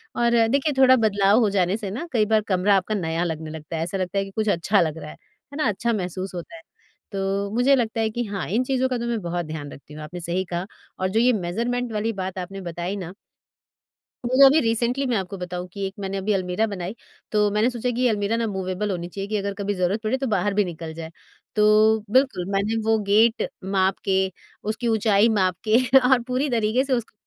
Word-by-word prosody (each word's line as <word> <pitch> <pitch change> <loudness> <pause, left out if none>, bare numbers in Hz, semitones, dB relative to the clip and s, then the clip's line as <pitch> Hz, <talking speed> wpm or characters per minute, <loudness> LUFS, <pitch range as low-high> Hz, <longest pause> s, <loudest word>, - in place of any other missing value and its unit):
और 235 0 +2
अ, 225 -1 +4
देखिए 280 +4 +1
थोड़ा 260 0 +7
बदलाव 205 -1 +3
हो 215 -4 +3
जाने 190 +1 +1
से 205 -4 -5
ना 315 +11 -5
कई 220 -4 +2
बार 220 0 +3
कमरा 190 +2 +3
आपका 210 +3 -1
नया 165 -2 -1
लगने 160 -2 -4
लगता 160 +1 -7
है, 160 - -1
ऐसा 185 +3 -3
लगता 185 +1 -3
है 195 - +2
कि 195 - -11
कुछ 215 +1 -1
अच्छा 195 +3 +2
लग 160 -1 -1
रहा 150 - -8
है। - - -12
है 280 +3 -16
ना, 300 - +1
अच्छा 230 +3 0
महसूस 185 -1 -4
होता 175 - -7
है। 330 - -11 0.5
तो 195 +1 -1
मुझे 255 +3 +4
लगता 230 -2 -1
है 220 - +1
कि 240 +2 -3
हाँ, 200 -3 -4
इन 235 +6 +1
चीज़ों 260 0 0
का 250 - -1
तो 235 - -4
मैं 235 -2 -1
बहुत 175 -1 -3
ध्यान 155 -2 -6
रखती 145 +2 -13
हूँ 155 - -8
आपने 175 +3 -7
सही 175 +3 -1
कहा। 175 +2 -2 0.3
और 185 0 0
जो 220 +4 +1
ये 250 +1 +4
मेज़रमेंट 230 +6 -2
वाली 220 +2 -1
बात 185 0 -4
आपने 195 +2 -6
बताई 175 +2 -4
ना 180 -1 -6 1.1
वो 260 +3 +6
अभी 290 +4 +6
रिसेंटली 235 +4 0
मैं 240 -4 +1
आपको 195 +1 -4
बताऊँ 180 0 -5
कि 200 -1 -3
एक 190 - -8
मैंने 195 0 -3
अभी 205 +2 0
अलमीरा 185 +3 0
बनाई 195 +1 -5 0.4
तो 210 -1 +3
मैंने 215 +4 +2
सोचा 245 0 -2
कि 245 +2 -3
ये 250 - +4
अलमीरा 210 +1 0
ना 230 -1 0
मूवेबल 190 +1 -2
होनी 175 -1 -4
चाहिए 195 +2 -6
कि 215 - 0
अगर 200 0 -2
कभी 200 0 -2
ज़रूरत 185 +4 0
पड़े 235 +5 0
तो 265 -1 -2
बाहर 205 -2 0
भी 205 0 +3
निकल 165 -2 -7
जाए। 165 0 -8 0.4
तो 215 +1 +5
बिल्कुल 260 -7 +2
मैंने 200 +3 0
वो 225 0 +3
गेट 225 +3 +4 0.2
माप 190 0 +1
के 190 -1 +2 0.5
उसकी 220 +3 -2
ऊँचाई 220 0 +3
माप 185 -4 +2
के 220 +2 +5 0.3
और 255 -2 +5
पूरी 260 +3 0
तरीके 230 +2 +1
से 270 -1 -1
उसको 235 -3 -2
205 Hz, 235 wpm, -23 LUFS, 185-230 Hz, 1.1 s, थोड़ा